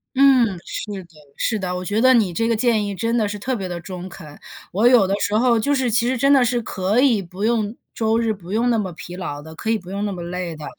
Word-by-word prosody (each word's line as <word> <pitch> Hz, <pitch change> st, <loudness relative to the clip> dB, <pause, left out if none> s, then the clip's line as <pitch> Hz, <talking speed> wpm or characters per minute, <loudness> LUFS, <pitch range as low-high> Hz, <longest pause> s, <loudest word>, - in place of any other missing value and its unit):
嗯， 260 Hz, -7 st, +4 dB
是 200 Hz, -3 st, -5 dB
的 170 Hz, -, -21 dB, 0.3 s
是 220 Hz, -3 st, -1 dB
的， 180 Hz, -2 st, -3 dB
我 180 Hz, 0 st, -5 dB
觉 210 Hz, +4 st, 0 dB
得 260 Hz, +1 st, +6 dB
你 215 Hz, -8 st, +2 dB
这 225 Hz, +6 st, 0 dB
个 230 Hz, -, +2 dB
建 220 Hz, -2 st, +1 dB
议 200 Hz, -1 st, -4 dB
真 230 Hz, +4 st, 0 dB
的 215 Hz, -3 st, +1 dB
是 205 Hz, +1 st, -4 dB
特 255 Hz, +5 st, -2 dB
别 195 Hz, -5 st, -4 dB
地 175 Hz, -1 st, -5 dB
中 180 Hz, +2 st, -8 dB
肯。 150 Hz, -6 st, -12 dB, 0.3 s
我 210 Hz, +6 st, +3 dB
有 245 Hz, -5 st, +6 dB
的 190 Hz, -, -1 dB
时 205 Hz, -, 0 dB
候 235 Hz, 0 st, +3 dB
就 285 Hz, +6 st, +1 dB
是 260 Hz, -3 st, 0 dB
其 235 Hz, +2 st, +2 dB
实 255 Hz, +1 st, 0 dB
真 275 Hz, +3 st, +3 dB
的 270 Hz, -2 st, +5 dB
是 245 Hz, 0 st, 0 dB
可 200 Hz, +1 st, -1 dB
以 245 Hz, -7 st, +3 dB
不 185 Hz, +2 st, -8 dB
用 220 Hz, -1 st, 0 dB, 0.2 s
周 220 Hz, 0 st, +1 dB
日 230 Hz, -1 st, +1 dB
不 185 Hz, -3 st, -11 dB
用 230 Hz, +4 st, +1 dB
那 230 Hz, -, +2 dB
么 190 Hz, -3 st, -3 dB
疲 175 Hz, +2 st, -9 dB
劳 160 Hz, -6 st, -5 dB
的， 160 Hz, +1 st, -11 dB
可 220 Hz, -, -5 dB
以 225 Hz, -, +2 dB
不 185 Hz, -3 st, -11 dB
用 200 Hz, +1 st, -2 dB
那 205 Hz, -, -2 dB
么 180 Hz, -3 st, -6 dB
累 175 Hz, -1 st, -4 dB
的， 155 Hz, -1 st, -9 dB
210 Hz, 300 characters per minute, -21 LUFS, 185-235 Hz, 0.3 s, 得